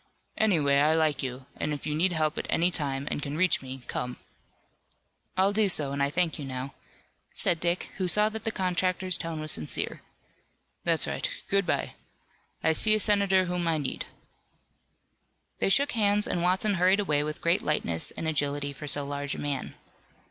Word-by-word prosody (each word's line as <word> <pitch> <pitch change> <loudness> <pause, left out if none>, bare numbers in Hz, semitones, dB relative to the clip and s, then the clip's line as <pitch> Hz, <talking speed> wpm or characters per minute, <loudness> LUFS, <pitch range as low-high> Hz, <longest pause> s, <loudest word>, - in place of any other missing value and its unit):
Anyway, 155 -10 +3
I 155 +2 +4
like 155 -4 +1
you, 130 0 -5
and 150 0 -1
if 145 - -9
you 150 - -1
need 175 +5 +2
help 155 -2 0
at - - -5
any 175 +2 +2
time 140 -4 -2
and - - -2
can 145 +1 -4
reach 185 0 +2
me, 130 -1 -8
come." 125 0 -4 1.2
"I'll 195 +2 +3
do 210 -1 +2
so, 150 -6 +2
and 140 0 -2
I 140 - +2
thank 170 +1 0
you - - -5
now," 130 0 -5 0.6
said 170 - +3
Dick, 175 +1 -1
who 185 -2 -1
saw 210 +4 +5
that 220 0 -7
the - - +1
contractor's 185 -1 0
tone 165 -3 -3
was 155 0 +2
sincere. 75 - -2 0.8
"That's - - +3
right, - - -2 0.2
good 200 -2 +2
bye. - - -1 0.7
I 160 - +4
see 215 +7 +5
a - - +1
senator 200 -3 +3
whom 180 -1 -2
I 165 -1 +2
need." 145 -3 -3 1.5
They - - +2
shook 280 +8 +3
hands 210 -3 +2
and 175 - -1
Watson 185 +4 +2
hurried 185 +2 +4
away 150 -7 +1
with 150 0 -4
great 170 +4 +1
lightness 85 - -1
and 160 - -5
agility 145 -2 -1
for 150 +2 -8
so 145 0 +3
large 145 0 -4
a - - -7
man. 145 -2 -3
160 Hz, 185 wpm, -28 LUFS, 145-185 Hz, 1.5 s, saw